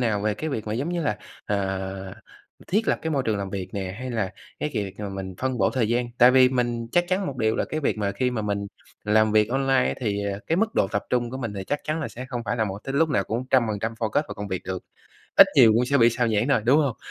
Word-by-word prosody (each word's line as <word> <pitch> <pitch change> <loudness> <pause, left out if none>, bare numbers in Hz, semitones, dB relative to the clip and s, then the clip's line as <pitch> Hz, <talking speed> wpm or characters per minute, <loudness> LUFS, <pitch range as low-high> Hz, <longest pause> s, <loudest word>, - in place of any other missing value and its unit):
nào 110 -4 +1
về 105 0 0
cái 155 +9 -4
việc 115 -6 -4
mà, 105 - -2
giống 130 +8 -2
như 175 -1 -1
là, 105 -9 -1 0.3
ờ, 95 -1 -3 0.5
thiết 210 +4 0
lập - - +2
cái 160 - -2
môi 140 -3 +1
trường 110 -2 +1
làm 100 -1 -4
việc 95 -2 -4
nè, 95 -2 -4
hay 130 0 -5
là 110 -5 -2 0.3
cái 150 - -1
kiệt 100 -4 -2
mà 105 -1 -4
mình 95 -1 -6
phân 130 -2 -1
bổ 95 - +3
thời 120 -5 0
gian, 120 +1 +1
tại 125 +1 +8
vì 130 0 +6
mình 120 -2 -1
chắc 175 - +3
chắn 190 +1 0
một 135 - -4
điều 110 -2 +1
là - - +1
cái 155 - -4
việc 135 - 0
mà 100 -1 -1
khi 125 +5 0
mà 115 -3 -2
mình 100 -1 -2 0.4
làm 110 +1 +3
việc 105 0 +4
online 135 0 +2
thì, 100 -4 -1
ờ, 100 -1 -2
cái 165 - +1
mức 220 +4 0
độ - - +3
tập 100 - -1
trung 120 -1 0
của 130 - -5
mình 115 -5 -4
thì 95 -1 -5
chắc 145 +8 -2
chắn 155 +1 -2
là 160 - -3
sẽ 125 +2 -8
không 120 -3 -4
phải 115 +3 -1
là 110 - +1
một 100 -2 -4
tới 135 - -4
lúc 160 +3 +3
nào 100 -9 +1
cũng 115 +3 -3
trăm 130 -2 +5
phần 105 -1 -2
trăm 115 +3 -2
focus 115 +6 +1
vào - - -6
công 100 0 -6
việc 95 -2 -3
được, 95 -1 -5 0.5
ít - - +10
nhiều 115 -5 +7
cũng 120 +2 +3
sẽ 140 +1 +2
bị 115 0 +6
sao 120 +1 0
nhãng 110 +3 +1
thôi, 140 - +3
đúng 130 +5 +5
hông? 140 -7 +1
115 Hz, 295 wpm, -25 LUFS, 100-130 Hz, 0.5 s, ít